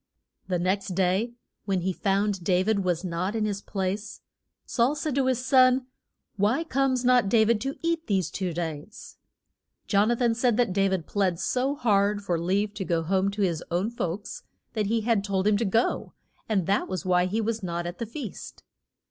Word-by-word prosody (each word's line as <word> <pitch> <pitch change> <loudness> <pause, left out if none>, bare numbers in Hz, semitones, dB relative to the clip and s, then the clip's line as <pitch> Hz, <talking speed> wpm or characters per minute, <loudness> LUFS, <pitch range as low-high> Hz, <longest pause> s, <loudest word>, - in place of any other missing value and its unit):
The 185 -2 0
next 185 +1 -1
day 195 +6 +1 0.3
when 195 -3 0
he 185 +2 -1
found 195 -1 0
Da 180 0 +2
vid 200 -1 +1
was 175 -1 0
not 180 +3 -2
in 220 -1 0
his 200 -1 -2
place, 195 +2 -4 0.4
Saul 250 +4 +1
said 300 -1 -2
to 265 0 +1
his 255 -1 0
son, 255 -1 +5 0.5
Why 220 +10 +2
comes 265 -4 0
not 245 -5 +4
Da 220 +1 +5
vid 220 -1 +2
to 270 +1 -3
eat 335 -1 -1
these 190 -5 0
two 185 -3 -2
days? 165 +5 -6 0.7
Jon 205 +1 +3
a 240 - +3
than 235 -1 +2
said 240 -1 +1
that 240 -7 +2
Da 195 0 +3
vid 185 -4 -1
pled 185 -4 0
so 265 +3 0
hard 205 -5 +2
for 175 -4 -1
leave 200 +5 0
to 200 - -4
go 170 -3 0
home 190 +3 +1
to 200 +1 -2
his 170 -4 0
own 180 +6 0
folks, 205 - -4 0.3
that 215 -3 0
he 225 +2 +1
had 220 -2 +1
told 195 -2 -1
him 210 -1 +4
to 230 - 0
go, 225 +4 0 0.4
and 195 -5 +1
that 195 +3 +1
was 185 -3 -4
why 180 0 +3
he 210 +5 -1
was 225 0 -1
not 175 -2 -3
at 175 +1 -6
the 230 - -3
feast. 235 -3 -8
205 Hz, 200 wpm, -26 LUFS, 185-235 Hz, 0.7 s, son